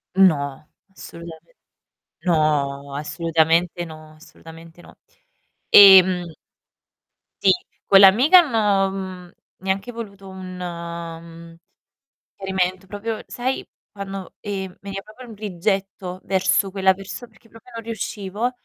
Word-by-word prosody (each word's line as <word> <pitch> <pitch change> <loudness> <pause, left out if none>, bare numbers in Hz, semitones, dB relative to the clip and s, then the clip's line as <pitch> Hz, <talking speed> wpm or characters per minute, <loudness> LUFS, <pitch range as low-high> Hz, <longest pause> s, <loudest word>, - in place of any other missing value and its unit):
No, 150 -7 +2 0.2
assolutamen 170 - -12 0.7
no, 140 -4 0
assolutamente 165 +3 0
no, 155 -1 -12
assolutamente 165 +1 -15
no. - - -17 0.7
Ehm 190 -3 +8 1.2
Sì, - - +6 0.3
con 195 -1 +6
l'amica 245 - +7
hanno 210 - +2
mhmm, 185 -2 -7 0.3
neanche 195 +5 -3
voluto 200 -4 -9
un, 185 -1 -9
mhmm, 170 -1 -8 0.8
chiarimento, 190 -1 -2
proprio 210 +3 -5
sai 255 +2 -3 0.2
quando, 195 -2 -8
ehm, 190 -3 -5
veniva 195 0 -6
proprio 245 +4 -14
un 225 - -10
rigetto 195 -1 -3
verso 190 +1 +1
quella 190 -1 +3
perso 195 +4 -8
perché 225 0 -24
proprio 225 +2 -17
non 230 0 -7
riuscivo. 220 0 -4
190 Hz, 105 wpm, -21 LUFS, 170-200 Hz, 1.2 s, Ehm